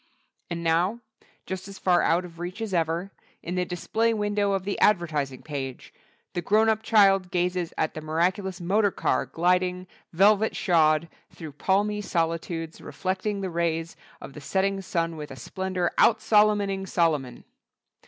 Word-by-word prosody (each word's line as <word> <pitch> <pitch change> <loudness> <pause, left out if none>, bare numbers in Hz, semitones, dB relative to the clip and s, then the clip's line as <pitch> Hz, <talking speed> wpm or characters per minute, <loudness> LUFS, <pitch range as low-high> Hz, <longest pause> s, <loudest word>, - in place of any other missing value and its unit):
And 170 -1 -4
now, 175 +8 +1 0.4
just 190 0 -5
as 195 -1 -10
far 180 -2 +3
out 175 +2 +2
of 170 -1 -13
reach 180 +4 -5
as 220 -3 -4
ever, 170 +3 -1 0.3
in 175 - -4
the 180 0 0
display 225 +6 0
window 205 -1 0
of 195 -1 -1
the 200 +1 -3
advertising 155 -9 +1
page, 135 -4 -6 0.4
the 175 - -2
grown 215 +5 +3
up 220 0 +1
child 195 -4 +4
gazes 180 -1 -1
at 155 - 0
the 155 - -6
miraculous 180 +5 -1
Motor 200 +4 +2
Car - - -1
gliding, 180 +1 +1 0.3
velvet 205 +5 +3
shod, 160 -2 +3 0.2
through 160 -3 -9
palmy 205 +7 0
solitudes 165 -2 -2
reflecting 195 +2 -3
the 190 -2 -3
rays 165 -1 -1 0.2
of - - -10
the 150 - -10
setting 195 +4 0
sun 165 -3 -2
with 150 -1 -7
a 135 - -8
splendor 185 +7 -2
out 230 - +6
Solomoning 205 -3 +2
Solomon. 155 -8 0
180 Hz, 155 wpm, -26 LUFS, 165-195 Hz, 0.4 s, out